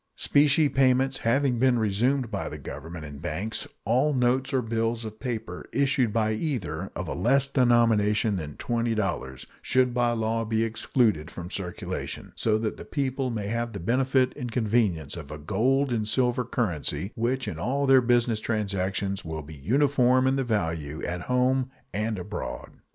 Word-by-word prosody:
Specie 145 +1 +4
payments 135 0 +2
having 125 +1 +1
been 130 -1 +4
resumed 115 +4 +1
by - - -3
the - - -7
Government 80 +2 -8
and 70 -1 -9
banks, 100 +6 -3 0.2
all 130 +7 +2
notes 125 +2 +1
or 130 -2 +1
bills 115 0 -1
of 110 0 -8
paper 110 -7 -5
issued 135 -4 +2
by 110 0 +1
either 105 - -3
of 90 - -4
a - - -3
less 130 +9 +3
denomination 115 -5 +3
than 75 -5 -5
$20 110 - -2 0.2
should 125 -1 +2
by 120 -1 +2
law 115 0 0
be 110 0 0
excluded 110 - +1
from 90 -1 -8
circulation, 90 -3 -5
so 110 -1 +2
that 110 0 -2
the - - -8
people 135 -2 -2
may 110 -4 -3
have 115 +2 -2
the 100 - -5
benefit 130 +6 +2
and 125 -4 -5
convenience 105 - +1
of 80 -5 -8
a 75 - -6
gold 125 - +1
and 110 -3 0
silver 125 +1 +1
currency 100 - -2
which 125 +3 -1
in 80 - -4
all 135 +8 0
their 135 -1 +6
business 120 -2 +2
transactions 100 -3 -2
will 80 -2 -5
be 75 +2 -10
uniform 130 - +3
in 130 +1 +3
value 80 - -2
at 90 0 -3
home 125 +3 +1 0.2
and 110 +1 -1
abroad. 95 +3 -6
115 Hz, 165 wpm, -26 LUFS, 100-130 Hz, 0.2 s, their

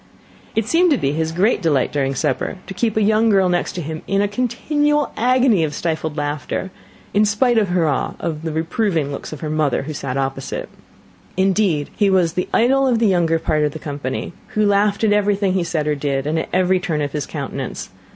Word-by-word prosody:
It 225 - +1
seemed 345 +8 +3
to 290 - +3
be 135 - 0
his 160 +1 -1
great 195 +7 +2
delight 145 -7 +1
during 135 -2 -1
supper 160 - -1
to - - -7
keep 220 +2 -1
a 215 - +3
young 220 +2 +3
girl 195 -3 +4
next 175 0 -1
him 160 -2 -5
in 195 - +1
a 205 - +2
continual 290 +7 0
agony 245 -5 +3
of 150 -2 -2
stifled 160 -2 -2
laughter, 145 +5 -3 0.4
in 205 - +4
spite 225 +3 +3
of 210 - +1
her 175 -2 +2
awe 145 - -1
of 160 -3 -3
the 160 -1 -3
reproving 160 -1 -1
looks 140 - -6
of 155 - -8
her 155 - -3
mother, 155 -4 +1
who 155 +2 -5
sat 135 -2 -4
opposite. 135 0 -3 0.7
Indeed, 190 -5 +1
he 205 -2 +3
was 180 -4 +2
the 180 - -2
idol 270 +3 +3
of 245 -3 +2
the 225 - +2
younger 170 -3 +2
part 155 -1 0
of 150 -1 0
the - - -5
company, 145 0 -5 0.2
who 215 0 +3
laughed 205 +1 +2
at 210 -2 +4
everything 205 -2 +1
he 185 -2 +1
said 160 -3 -2
or 150 - +1
did, 140 -2 -2
and 155 +2 0
at - - -4
every 185 0 +2
turn 165 -6 -1
of 145 - -3
his 150 -1 -3
countenance. 140 - -5
175 Hz, 215 wpm, -20 LUFS, 150-210 Hz, 0.7 s, girl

